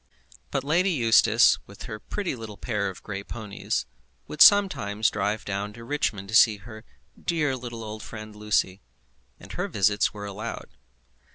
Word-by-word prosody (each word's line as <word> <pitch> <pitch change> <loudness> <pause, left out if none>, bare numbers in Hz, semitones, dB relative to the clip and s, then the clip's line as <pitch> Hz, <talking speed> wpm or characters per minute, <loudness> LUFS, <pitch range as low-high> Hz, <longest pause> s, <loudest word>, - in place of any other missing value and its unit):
But 135 - -2
Lady 170 +7 +2
Eustace, 115 - +4
with 100 - -11
her 110 -4 -7
pretty 195 - -4
little 110 -3 -9
pair 105 -4 -2
of 95 - -11
grey 100 -1 -5
ponies, 105 -2 -4 0.4
would 150 - -5
sometimes 110 - +5
drive 105 +1 -2
down 100 +1 -3
to 115 +1 -11
Richmond 115 -7 -2
to - - -7
see 110 -1 +6
her 110 +2 -12 0.4
"dear 150 -5 0
little 120 -2 -7
old 110 0 -7
friend" 110 -1 -9
Lucy, 105 -2 0 0.6
and - - -12
her - - -3
visits 100 0 +2
were 105 -1 -8
allowed. 105 +3 -6
110 Hz, 160 wpm, -26 LUFS, 105-120 Hz, 0.6 s, see